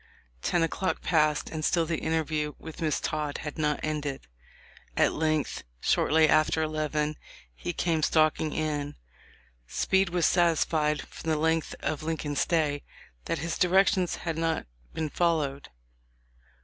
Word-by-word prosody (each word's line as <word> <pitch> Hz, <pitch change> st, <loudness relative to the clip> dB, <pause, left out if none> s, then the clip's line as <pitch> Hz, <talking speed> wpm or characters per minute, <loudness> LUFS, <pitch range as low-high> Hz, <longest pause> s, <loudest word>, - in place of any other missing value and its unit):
Ten 170 Hz, -, +1 dB
o'clock 185 Hz, +3 st, -1 dB
passed, 155 Hz, -3 st, +2 dB
and 155 Hz, -1 st, -4 dB
still 165 Hz, +1 st, +2 dB
the 160 Hz, -1 st, -2 dB
interview 155 Hz, -2 st, -1 dB
with 160 Hz, 0 st, -10 dB
Miss 155 Hz, -2 st, +1 dB
Todd 150 Hz, -2 st, -2 dB
had 150 Hz, +1 st, -5 dB
not 150 Hz, -1 st, +1 dB
ended. 150 Hz, -, -3 dB, 0.7 s
At -, -, +4 dB
length, 155 Hz, -1 st, 0 dB, 0.2 s
shortly 155 Hz, -, +3 dB
after 155 Hz, +1 st, +3 dB
eleven, 155 Hz, -1 st, -1 dB, 0.4 s
he 120 Hz, -, -4 dB
came 165 Hz, -2 st, 0 dB
stalking 155 Hz, 0 st, +2 dB
in. 150 Hz, -2 st, -2 dB, 0.7 s
Speed 190 Hz, -, +2 dB
was 175 Hz, -1 st, +1 dB
satisfied, 160 Hz, -3 st, +2 dB
from 160 Hz, -, -7 dB
the 155 Hz, -, +2 dB
length 160 Hz, +1 st, 0 dB
of 155 Hz, -, -2 dB
Lincoln's 155 Hz, -2 st, -2 dB
stay, 150 Hz, -4 st, +1 dB, 0.4 s
that -, -, -1 dB
his 165 Hz, -, -3 dB
directions 185 Hz, 0 st, +3 dB
had 165 Hz, -1 st, -2 dB
not 165 Hz, -1 st, 0 dB, 0.3 s
been 160 Hz, -, -2 dB
followed. 150 Hz, -5 st, 0 dB
155 Hz, 135 wpm, -28 LUFS, 150-165 Hz, 0.7 s, At